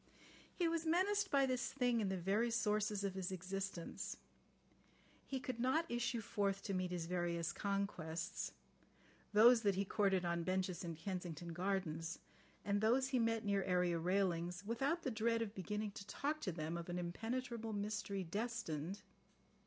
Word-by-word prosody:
He 350 - +2
was 330 0 0
menaced 385 +5 +2
by 275 -4 +4
this 255 -2 0
thing 245 -3 +2
in 200 - +1
the 190 - 0
very 200 +7 +2
sources 210 -3 +1
of 195 -1 0
his 190 -1 -3
existence. 190 -1 -4 1.1
He 270 - -2
could 255 -2 -4
not 265 +7 +3
issue 240 0 0
forth 195 -2 0
to 200 - -2
meet 185 -1 0
his 175 -2 -2
various 170 -1 -1
conquests, 195 -5 -2 0.8
those 225 +3 +8
that 200 -3 +3
he 195 +1 +1
courted 195 -3 +2
on 170 0 +1
benches 185 0 -1
in 170 -2 -4
Kensington 175 -1 -4
Gardens, 170 -3 -1 0.5
and 205 0 +2
those 255 +5 +4
he 260 -2 +2
met 225 -1 +1
near 200 -1 +2
area 180 -2 +2
railings, 180 0 +1
without 270 +10 0
the 260 - 0
dread 230 +1 +2
of 210 -2 -6
beginning 210 +2 -2
to 195 0 -9
talk 300 +6 -1
to 190 - -1
them 160 0 -3
of 170 +1 -6
an 175 - -2
impenetrable 225 +6 -3
mystery 205 -1 -2
destined. 200 -3 -3
200 Hz, 160 wpm, -39 LUFS, 180-230 Hz, 1.1 s, those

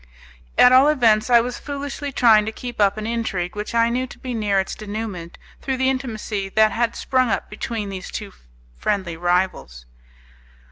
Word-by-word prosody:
At 250 - +7
all 260 +3 +7
events, 235 -7 +3
I 240 -1 +6
was 245 +1 -5
foolishly 285 0 -5
trying 220 -4 +4
to - - -1
keep 240 -1 -6
up 200 +1 +3
an 215 - -4
intrigue 215 -6 -2
which 210 +2 -5
I 230 0 +4
knew 255 +2 -1
to - - -13
be 255 -1 -6
near 205 -3 +1
its 190 - -2
denouement 205 -5 -6 0.2
through 265 -1 -2
the 260 +1 +2
intimacy 220 -6 -4
that 215 +2 +3
had 235 0 -1
sprung 255 -2 +1
up - - -2
between 210 -1 -4
these 190 -2 -7
two - - -7 0.4
friendly 185 - -2
rivals. 175 - -1
220 Hz, 180 wpm, -21 LUFS, 200-250 Hz, 0.4 s, At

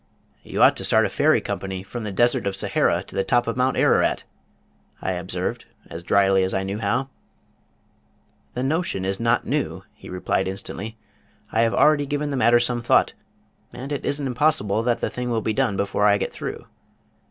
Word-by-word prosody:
"You - - 0
ought - - +6
to - - -2
start - - +3
a - - -1
Ferry - - +3
Company 95 -1 -4
from 115 +4 -7
the 105 - -3
Desert 120 +1 +2
of 100 - -2
Sahara 95 - +1
to - - -12
the 95 - +1
top 120 +3 +2
of 115 - -2
Mount 130 +1 +1
Ararat," - - +2 0.8
I - - -2
observed, 90 0 -4 0.3
as 85 - -6
dryly 95 +1 +3
as 95 - -1
I 95 - 0
knew 100 +2 -4
how. 120 +6 -1 1.5
"The 125 - -2
notion 145 - -1
is 95 0 -2
not 115 +1 +1
new," - - -2
he - - -13
replied 90 +1 -1
instantly. 100 +3 -6 0.5
"I 110 - +2
have 115 -1 +2
already 150 -1 +4
given 145 +1 -2
the 140 - -2
matter 120 -1 +5
some 120 0 0
thought, 120 - +3 0.6
and 135 +3 -8
it 145 - -3
isn't 145 0 -1
impossible 125 -6 +1
that 120 0 0
the - - 0
thing 125 0 -4
will 115 -2 0
be 110 - 0
done 125 -6 0
before 100 +1 +1
I 100 0 +4
get - - -3
through. - - -6
115 Hz, 195 wpm, -23 LUFS, 95-125 Hz, 1.5 s, ought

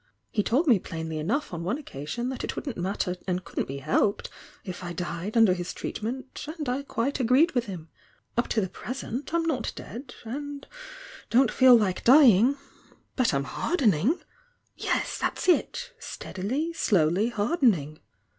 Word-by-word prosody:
Ha 210 - +4
told 260 - +2
me 240 - +5
plainly 160 -2 -5
enough 220 - -1
on 170 -1 -4
one 200 +10 -1
occasion 240 - -5
that 260 - -5
it - - -3
wouldn't 270 -6 -4
matter 180 0 -2
and 180 0 -1
couldn't - - -3
be 135 - -5
helped 155 +8 0 0.3
if 185 0 -7
I 175 0 -4
died 180 +5 -3
under 220 -5 +6
his 175 -1 -4
treatment 255 +5 -5
— 310 +3 -7
and 300 -3 -4
I 255 +3 0
quite 275 0 -2
agreed 260 +7 +4
with 245 -3 0
him. 175 -5 -7 0.5
Up 235 - +1
to 220 - +1
the 190 - -1
present 255 +6 -6
I'm 335 0 +1
not 290 -8 -1
dead 245 +4 -9
and 285 +4 -5 0.6
don't 245 0 +4
feel 255 -2 +7
like 195 -5 0
dying— 255 -1 +7 0.6
but 255 -3 +2
I'm 140 -1 0
hardening! 240 - +1 0.6
Yes! - - -1
that's - - -2
it! 485 +7 +1
Stead - - -8
ily, 280 - -1
slowly 190 - +2
hardening! 205 - +1
230 Hz, 165 wpm, -27 LUFS, 180-275 Hz, 0.6 s, feel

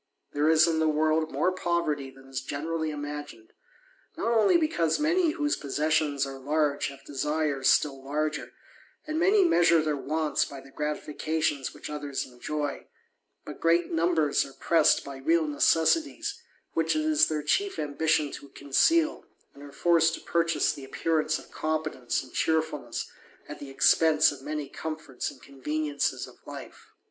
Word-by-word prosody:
There 150 +2 +2
is 160 -1 +6
in 160 -1 +1
the 160 - +2
world 155 +1 +1
mot 185 0 0
poverty 155 -6 -1
than 135 0 -17
is 135 -1 -4
generally 160 +2 -3
imagined; 145 -6 -7 0.6
not 230 - 0
only 220 - +5
because 170 - +1
man 325 +2 +2
whose 295 -3 0
possessions 145 0 0
are 135 0 -7
large 145 +1 0
have 135 0 -11
desires 145 -1 -1
still 135 -3 +2
larger, 150 +2 -2 0.5
an 310 +1 -2
many 390 +3 +4
measure 170 - +4
their 155 -1 0
wants 150 +1 0
by 140 - -7
the 135 +1 -15
gratifications 150 -1 -2
which - - -8
othe: 145 -2 -4
enjoy: 145 +3 -4 0.6
but - - -8
great 170 +1 +2
numbers 165 -3 +2
are 135 - -11
pressed 165 +1 +3
by 140 -1 -7
real 160 +4 +2
necessiti 225 - +2 0.5
which - - +1
it 310 - +1
is 310 0 +4
their 155 -1 -2
chief 395 - 0
ambition 150 0 0
to 140 - -9
conceal, 310 - +2 0.3
and 140 - -15
are 145 0 -10
forced 165 +2 +2
purchase 170 0 +1
the 140 - -10
appearance 155 +3 0
of - - -14
competence 155 -6 -2
and 130 - -16
cheerfulness 155 -6 -1 0.5
the 140 - -8
expence 155 +3 +4
of 140 -2 -10
many 150 0 -4
comforts 155 -3 -5
and 130 - -15
conveniencies 145 +2 -2
of - - -17
life. - - -10
155 Hz, 155 wpm, -27 LUFS, 140-165 Hz, 0.6 s, is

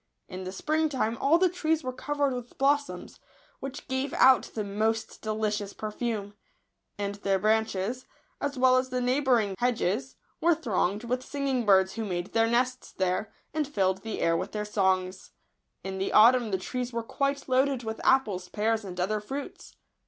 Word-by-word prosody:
In 185 0 -7
the 185 - -4
spring 310 +10 0
time 235 -5 -1
all 300 +4 +5
the 370 +1 +4
trees 320 -3 0
were 255 0 -3
covered 285 +1 -1
with 245 -1 -7
blossoms, 285 +1 0 0.4
which 275 +1 -7
gave 260 +1 -2
out 260 -1 +5
the 215 - -1
most 220 +3 -2
delicious 215 -2 -2
perfume; 215 -1 -4 0.6
and 200 0 -2
their 195 -1 +2
branches, 220 +3 0 0.3
as 285 -1 -2
well 255 0 +5
as 255 0 0
the 255 0 -1
neigh 250 +2 +1
bouring 240 -8 +2
hedges, 245 +1 0 0.3
were 340 0 +4
thronged 210 - -1
with 250 +2 -1
singing 265 -4 -2
birds 190 -1 +5
w 225 - -1
ho - - -5
made 175 0 -3
their 225 0 +3
nests 250 +2 0
there, 190 +3 -1 0.2
and 305 -2 0
filled 190 -8 0
the 225 0 -5
air 165 - +3
with - - -3
their 210 -1 -2
songs. 190 -2 0 0.5
In 190 0 -5
the 195 - -2
autumn 235 +2 +6
the 190 - 0
trees 250 +6 -4
were 235 -1 -3
quite 275 +3 -2
loaded 260 -1 +2
with 220 0 -5
apples, 205 -9 +2
pears, 220 +1 0
and 180 -2 -7
other 210 +4 0
fruits. 270 +7 -7
230 Hz, 180 wpm, -28 LUFS, 200-265 Hz, 0.6 s, autumn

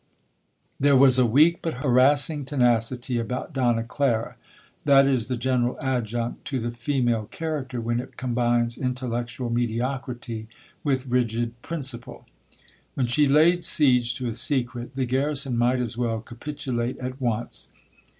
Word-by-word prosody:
'There 140 0 +5
was 130 -1 +6
a 125 - +4
weak 155 +9 +4
but 165 - -3
harassing 140 +4 +4
tenacity 125 -2 +1
about 125 +7 -4
Donna 120 -4 +1
Clara, 120 -2 -1 0.5
that 140 -1 +6
is 130 -5 +1
the 125 -1 -2
general 125 0 0
adjunct 120 -4 -2
to 135 - -2
the 120 0 -3
female 120 -2 0
character 140 -2 -4
when 115 +1 -1
it 130 - -9
combines 120 -1 0
intellectual 125 -1 -3
mediocrity 120 -1 -3 0.4
with 135 -3 0
rigid 120 -1 -1
principle. 130 -6 -5 0.7
When 130 - +1
she 140 +5 +3
laid 165 +5 +4
siege 125 -5 +3
to 125 -1 -3
a 115 - -2
secret, 125 0 -2
the 135 -1 0
garrison 135 +1 0
might 120 +2 +2
as 120 -1 -3
well 115 -2 0
capitulate 125 0 -4
at 130 +1 -6
once. 120 -1 -3
125 Hz, 140 wpm, -25 LUFS, 120-135 Hz, 0.7 s, was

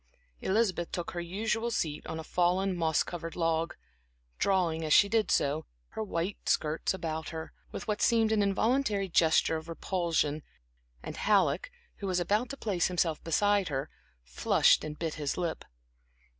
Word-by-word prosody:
Elizabeth 190 -4 0
took 175 - -3
her 175 - -4
usual 220 +6 -1
seat 155 -9 -2
on 160 - -4
a - - -5
fallen 180 +3 +1
moss 160 -3 +2
covered 165 -1 -6
log, 165 -1 0 0.6
drawing, 175 -5 +1
as 155 -1 +2
she 200 - +7
did 220 -1 +1
so, 145 +3 +1 0.2
her - - -5
white 190 -2 -3
skirts 155 +1 +1
about 160 -4 -4
her, 160 0 -7 0.2
with - - -6
what 210 -1 -1
seemed 225 -2 +3
an 215 -1 +3
involuntary 205 +1 +1
gesture 160 -2 +3
of 160 +1 -9
repulsion, 165 -3 -1 0.6
and - - -7
Halleck, 205 - +2 0.3
who 200 - -5
was 185 -1 +1
about 210 +7 +1
to 275 - -6
place 190 -8 0
himself 170 -3 0
beside 200 +3 +2
her, 135 -2 -3 0.3
flushed - - +3
and 150 -1 -6
bit 165 -2 -2
his 145 - -1
lip. 175 -2 -2
175 Hz, 160 wpm, -30 LUFS, 160-205 Hz, 0.6 s, she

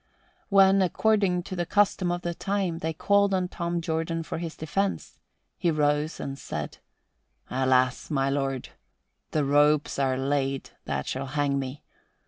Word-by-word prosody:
When, 195 -1 +6
according 190 -1 +2
to 185 - -6
the 175 -2 -2
custom 195 -3 +2
of 175 0 -3
the 175 - -2
time, 190 -2 -2
they 160 0 -2
called 200 +4 +2
on 185 -1 0
Tom 170 -1 -3
Jordan 165 0 -2
for 160 - -5
his 165 -1 -5
defense, 195 +5 -2 0.4
he 175 - +2
rose 150 0 +1
and 135 0 -5
said, - - -5 0.7
"Alas, 130 0 +2
my 135 -2 +1
lord, 135 -2 -1 0.6
the 150 -2 0
ropes 145 +1 +3
are 130 -1 +1
laid 135 0 -1
that 70 0 -2
shall 135 +1 -3
hang 140 0 0
me. 135 +2 -6
160 Hz, 150 wpm, -27 LUFS, 140-180 Hz, 0.7 s, When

